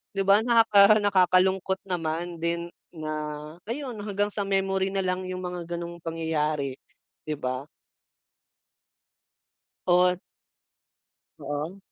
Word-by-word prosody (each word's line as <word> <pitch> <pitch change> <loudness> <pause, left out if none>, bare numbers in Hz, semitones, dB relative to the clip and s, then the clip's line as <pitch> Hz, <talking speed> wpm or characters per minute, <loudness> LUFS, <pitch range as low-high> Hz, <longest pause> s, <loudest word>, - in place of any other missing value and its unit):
'di 195 - +1
ba 200 +2 +6
nakaka 220 -3 +6
nakakalungkot 190 0 +3
naman 170 -1 -3
din 170 +1 -2 0.2
na 155 -1 -4 0.6
ayun 260 0 -4
hanggang 205 0 -1
sa 205 - -2
memory 195 -1 +1
nalang 185 -1 -1
yung 185 0 -4
mga 175 -1 -4
ganong 170 0 -6
pangyayari, 155 -4 -2 0.5
'di 150 - 0
ba. 130 +1 -3 2.2
Or 180 0 +4 1.2
Oo. 150 +7 -4
180 Hz, 100 wpm, -26 LUFS, 165-195 Hz, 2.2 s, ba